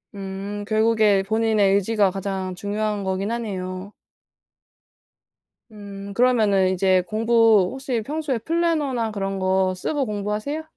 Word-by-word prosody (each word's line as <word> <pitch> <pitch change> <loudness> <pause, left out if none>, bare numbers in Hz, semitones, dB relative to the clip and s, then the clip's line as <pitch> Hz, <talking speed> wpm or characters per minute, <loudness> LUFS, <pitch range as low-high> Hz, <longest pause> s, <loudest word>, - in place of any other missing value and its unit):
음. 195 +1 -6
결국에 215 -3 +3
본인의 215 -2 +2
의지가 200 -1 +2
가장 190 -1 -4
중요한 205 +1 -2
거기는 190 +4 -2
하네요. 190 -3 -5 1.8
음. 200 -1 -9
그러면은 215 -6 +3
이제 185 0 +2
공부 225 -3 +3
혹시 265 -3 -3
평소에 295 0 -2
플래너나 300 -8 0
그런 195 -1 -3
거 185 0 +1
쓰고 275 +8 -2
공부하세요? 210 +9 -3
205 Hz, 275 characters per minute, -23 LUFS, 195-230 Hz, 1.8 s, 결국에